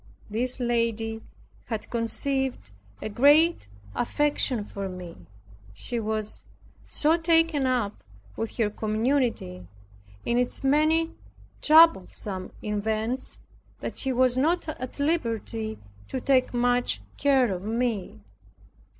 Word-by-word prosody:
This 250 +4 -2
lady 230 -2 -1 0.4
had 220 -3 -4
conceived 250 - -1 0.3
a - - -2
great 290 - +4 0.3
affection 270 -3 0
for 195 -1 -5
me. 180 -2 -8 0.6
She 235 - -3
was 215 -1 -3 0.4
so 315 +2 +3
taken 325 -4 +2
up 240 -5 -1 0.3
with 225 - -4
her 215 -3 +1
community, 215 - -1 0.6
in 240 +1 +2
its 250 +2 -1
many 310 +4 +3 0.5
troublesome 210 - +4
events 220 +4 -1 0.4
that - - -4
she 265 - -1
was 255 0 +2
not 330 +5 +1
at 255 -3 -6
liberty 230 -7 -1 0.3
to 260 - -3
take 260 0 +2
much 245 - +1 0.2
care 265 -6 +3
of 180 - -5
me. 220 - -2
240 Hz, 105 wpm, -26 LUFS, 215-275 Hz, 0.6 s, great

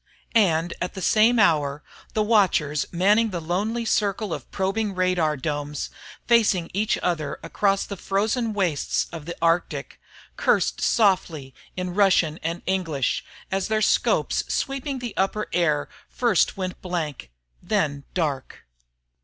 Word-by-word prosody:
And 175 -6 +3
at 180 - -3
the 190 - -5
same 225 +3 +4
hour, 150 -8 +2 0.3
the 215 - +2
watchers 185 -9 +2
manning 205 +6 +3
the 180 -4 -3
lonely 205 +8 -2
circle 205 -3 0
of - - -7
probing 195 +1 -1
radar 180 -4 +1
domes, 145 +1 -3 0.4
facing 215 -7 +3
each 210 +3 +1
other 155 -5 -1
across 195 -1 +1
the 200 - -6
frozen 220 +5 0
wastes 180 -8 0
of 165 -2 -8
the 170 - -4
Arctic, 170 +1 0 0.4
cursed - - +1
softly 170 - +1 0.2
in 180 -1 -3
Russian 180 -5 +3
and 165 +2 -3
English 165 -8 -1 0.3
as 195 0 0
their 220 0 +1
scopes - - +2
sweeping 275 0 -2
the 245 -3 -6
upper 205 +3 0
air 155 -4 +1 0.2
first 235 -8 +1
went 185 -1 -4
blank 160 - -4 0.3
and - - -22
then 145 -2 0
dark. 150 - -3
185 Hz, 135 wpm, -24 LUFS, 160-210 Hz, 0.4 s, same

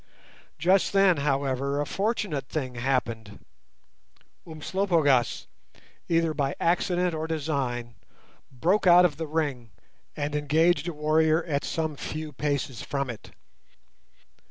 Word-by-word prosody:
Just 185 +3 +2
then, 195 -4 +5
however, 140 -1 0
a 145 - 0
fortunate 195 - -2
thing 130 -5 -3
happened. 120 -4 -2 1.0
Umslopogaas, 160 -5 +1 0.6
either 165 -1 +2
by 140 -2 -1
accident 180 +1 +1
or 160 0 -3
design, 140 -7 -2 0.6
broke 175 +10 +1
out 180 0 +8
of 150 -5 0
the 160 0 -4
ring 145 -7 -2 0.5
and 145 0 -3
engaged 155 +2 +2
a 175 - -3
warrior 155 +2 +2
at 145 -4 -2
some 160 -2 -2
few 155 +2 -6
paces 140 -4 -2
from 140 -3 -3
it. 110 - -12
150 Hz, 115 wpm, -26 LUFS, 135-165 Hz, 1.0 s, out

